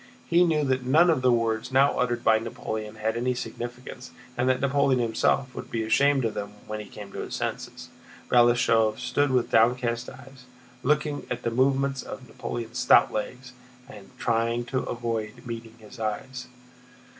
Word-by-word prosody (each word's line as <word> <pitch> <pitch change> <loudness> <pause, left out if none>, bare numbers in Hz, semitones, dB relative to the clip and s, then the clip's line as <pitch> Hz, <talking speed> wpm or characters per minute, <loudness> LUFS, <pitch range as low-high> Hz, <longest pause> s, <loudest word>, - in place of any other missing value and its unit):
He 175 +1 +4
knew 160 -3 +2
that 130 -2 +1
none 160 +7 +5
of 150 -5 0
the 125 -1 +4
words 115 0 0
now 135 +2 +3
uttered 120 -1 0
by 110 0 +4
Napoleon 110 -1 -5
had 110 +1 -2
any 125 +2 0
significance, 120 +1 -7 0.3
and 125 +1 +1
that 130 - +2
Napoleon 140 -1 +2
himself 120 +2 +1
would - - -8
be 115 -1 -2
ashamed 135 +3 +3
of 110 - -1
them 100 0 -5
when 110 0 -5
he 105 - -8
came 100 -2 -10
to - - -7
his - - -5
senses. - - -5 0.4
Balashëv 120 -2 +4
stood 140 +3 0
with 125 -2 +1
downcast 120 +1 +2
eyes, 135 -2 -14 0.4
looking 150 +1 0
at - - -4
the 115 - -1
movements 135 +2 +1
of 130 - -9
Napoleon's 115 +1 -5
stout - - +5
legs 125 +4 -5 0.3
and 105 -7 -13
trying 115 +1 0
to 130 +2 -1
avoid 115 -1 -4
meeting 115 -1 -7
his 110 +2 -14
eyes. 125 +4 -4
120 Hz, 170 wpm, -26 LUFS, 115-130 Hz, 0.4 s, none